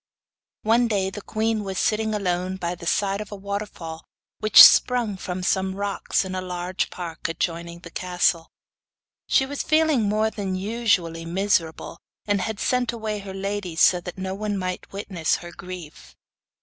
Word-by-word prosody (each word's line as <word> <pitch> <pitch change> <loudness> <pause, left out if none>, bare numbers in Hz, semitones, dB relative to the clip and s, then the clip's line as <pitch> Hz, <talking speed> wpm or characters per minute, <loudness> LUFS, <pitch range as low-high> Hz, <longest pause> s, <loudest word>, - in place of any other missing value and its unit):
One 230 +2 +3
day 195 -3 0
the 205 - -7
queen 220 +1 -1
was 190 -1 -4
sitting 215 +1 +1
alone 185 -2 -1
by 175 -1 -2
the 170 -1 -8
side 200 +2 +1
of 210 - -8
a - - -5
waterfall 195 -5 -6 0.4
which 215 - +9
sprung 240 -5 +5
from 185 -1 -5
some 190 0 0
rocks 200 -1 -1
in 190 - -5
the 185 0 -3
large 180 0 -3
park 170 -2 -5
adjoining 170 +1 -3
the 170 - -11
castle. 175 -2 0 0.8
She 265 - +3
was 285 +1 -4
feeling 310 -9 +2
more 215 +1 +1
than 195 -3 -3
usually 185 -5 0
miserable, 170 -2 -1 0.3
and 205 -2 +1
had 220 0 -3
sent 250 -1 +1
away 220 -2 -4
her 195 -1 -8
ladies 195 -3 -3
so 180 -1 +5
that 180 +1 -8
no 190 0 -3
one 205 0 -2
might 185 -1 -4
witness 190 -5 -1
her 175 0 -8
grief. 170 - -10
190 Hz, 165 wpm, -24 LUFS, 180-210 Hz, 0.8 s, which